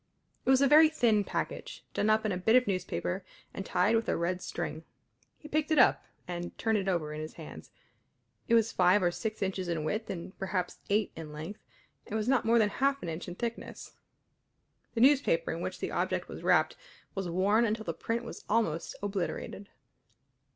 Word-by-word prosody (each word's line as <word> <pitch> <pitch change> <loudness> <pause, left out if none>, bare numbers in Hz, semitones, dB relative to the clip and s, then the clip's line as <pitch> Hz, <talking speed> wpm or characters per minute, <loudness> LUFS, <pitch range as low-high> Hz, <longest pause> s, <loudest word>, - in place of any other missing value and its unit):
It - - +3
was 265 +1 +6
a - - +6
very 310 +2 +8
thin 230 -9 +3
package, - - -4
done 210 - +1
up 215 0 +3
in 215 - +1
a 180 - -1
bit 220 +6 +3
of 255 0 +5
newspaper 185 -1 -2 0.3
and 195 - -4
tied 200 +4 +2
with 225 0 0
a - - +1
red 175 +2 -1
string. 160 -2 -4 0.5
He 300 - -12
picked 310 0 0
it 315 - +2
up 250 - +5 0.2
and 175 0 -5
turned 220 -2 +1
it 195 - -4
over 165 -5 0
in 155 - -5
his 155 - -7
hands. - - -10 0.8
It 230 - +4
was 230 -1 +3
five 185 +2 +4
or 175 - +3
six 215 +3 -3
inches 190 -1 -2
in 165 -3 -1
width 215 +9 -2
and 185 0 -6
perhaps 185 -2 -2
eight 205 +1 +2
in 160 -2 -8
length, 160 +8 -7 0.5
and 210 - -4
was 220 0 -1
not 260 -1 +3
more 230 +1 +4
than 215 -2 +4
half 275 +5 0
an 170 - -3
inch 160 +2 -5
in 175 - -6
thickness. 235 +3 -5 1.0
The 230 - +1
newspaper 295 - +4
in - - -4
which - - -4
the - - -3
object - - -1
was - - -8
wrapped - - +3 0.4
was 195 -3 -3
worn 200 +6 +3
until 220 -1 -1
the - - -2
print 230 +1 -2
was - - -8
almost 190 -8 0
obliterated. 200 0 -3
205 Hz, 200 wpm, -30 LUFS, 180-230 Hz, 1.0 s, very